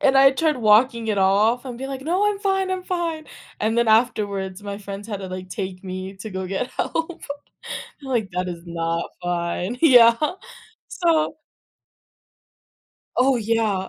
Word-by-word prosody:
And 270 Hz, 0 st, +4 dB
I 270 Hz, 0 st, +8 dB
tried 305 Hz, +1 st, +1 dB
walking 230 Hz, +1 st, +4 dB
it 205 Hz, -2 st, +1 dB
off 210 Hz, +6 st, +3 dB
and 245 Hz, -2 st, -6 dB
be 265 Hz, +2 st, -5 dB
like, 270 Hz, -1 st, -5 dB
"No, 365 Hz, +7 st, +1 dB
I'm 400 Hz, -, -4 dB
fine. 385 Hz, -1 st, 0 dB
I'm 370 Hz, -1 st, -2 dB
fine." 335 Hz, -4 st, -3 dB, 0.3 s
And 220 Hz, +2 st, +1 dB
then 235 Hz, -1 st, +3 dB
afterwards, 205 Hz, -4 st, +1 dB
my 200 Hz, 0 st, -5 dB
friends 200 Hz, 0 st, -7 dB
had 200 Hz, -2 st, -4 dB
to 190 Hz, -, -5 dB
like, 185 Hz, 0 st, -7 dB
take 185 Hz, -1 st, -5 dB
me 185 Hz, +1 st, -5 dB
to 215 Hz, +2 st, -7 dB
go 190 Hz, 0 st, -4 dB
get 195 Hz, +7 st, -2 dB
help. 330 Hz, +1 st, -3 dB, 0.8 s
Like, 235 Hz, -7 st, -1 dB
"That 180 Hz, 0 st, -2 dB
is 170 Hz, -1 st, -6 dB
not 165 Hz, 0 st, -2 dB
fine." 175 Hz, +6 st, -2 dB
Yeah. 240 Hz, -6 st, +8 dB, 0.7 s
So. 325 Hz, -3 st, +1 dB, 1.8 s
Oh 260 Hz, 0 st, +4 dB
yeah, 215 Hz, -4 st, 0 dB
220 Hz, 160 wpm, -23 LUFS, 190-270 Hz, 1.8 s, I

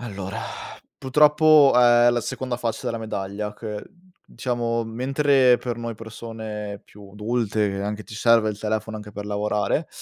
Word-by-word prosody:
Allora, 100 Hz, -3 st, -6 dB, 0.6 s
purtroppo 150 Hz, +1 st, +5 dB
è 120 Hz, -1 st, +6 dB
la 120 Hz, 0 st, 0 dB
seconda 125 Hz, +1 st, -4 dB
faccia 115 Hz, -2 st, -3 dB
della 115 Hz, -, -2 dB
medaglia 105 Hz, -1 st, -4 dB
che, 105 Hz, -1 st, -6 dB, 0.4 s
diciamo, 115 Hz, -2 st, -2 dB
mentre 130 Hz, +2 st, +3 dB
per 120 Hz, -2 st, -4 dB
noi 115 Hz, -1 st, -5 dB
persone 110 Hz, -2 st, -7 dB
più 100 Hz, -1 st, -15 dB
adulte 105 Hz, -2 st, -1 dB
anche 105 Hz, +1 st, -4 dB
ti 110 Hz, -, -11 dB
serve 115 Hz, -1 st, +3 dB
il 105 Hz, -, -8 dB
telefono 110 Hz, 0 st, -3 dB
anche 105 Hz, 0 st, -10 dB
per 105 Hz, 0 st, -6 dB
lavorare, 105 Hz, +8 st, -1 dB
110 Hz, 145 wpm, -23 LUFS, 105-120 Hz, 0.6 s, è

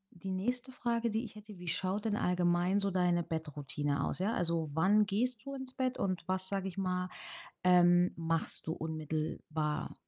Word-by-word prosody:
die 185 Hz, +3 st, -7 dB
nächste 245 Hz, +7 st, -2 dB
Frage, 235 Hz, -2 st, 0 dB
die 220 Hz, +2 st, -1 dB
ich 220 Hz, -, -9 dB
hätte: 210 Hz, -1 st, -11 dB
Wie 175 Hz, 0 st, -9 dB
schaut 185 Hz, +5 st, 0 dB
denn 210 Hz, -2 st, +1 dB
allgemein 180 Hz, +1 st, +2 dB
so 200 Hz, -1 st, 0 dB
deine 175 Hz, -2 st, +2 dB
Bettroutine 145 Hz, -3 st, -2 dB
aus, -, -, -3 dB
ja? 200 Hz, +4 st, +1 dB
Also, 165 Hz, -2 st, 0 dB
wann 200 Hz, +6 st, +5 dB
gehst 225 Hz, +3 st, +1 dB
du 275 Hz, 0 st, -5 dB
ins 265 Hz, -1 st, -3 dB
Bett 255 Hz, -1 st, 0 dB
und 185 Hz, -3 st, -2 dB
was, 185 Hz, 0 st, 0 dB
sage 195 Hz, -1 st, -1 dB
ich 190 Hz, -, -7 dB
mal, 180 Hz, -1 st, -1 dB, 0.5 s
ähm, 175 Hz, 0 st, +6 dB
machst 165 Hz, -1 st, -1 dB
du 160 Hz, -, -1 dB
unmittelbar 155 Hz, -1 st, -3 dB
180 Hz, 180 wpm, -33 LUFS, 165-210 Hz, 0.5 s, ähm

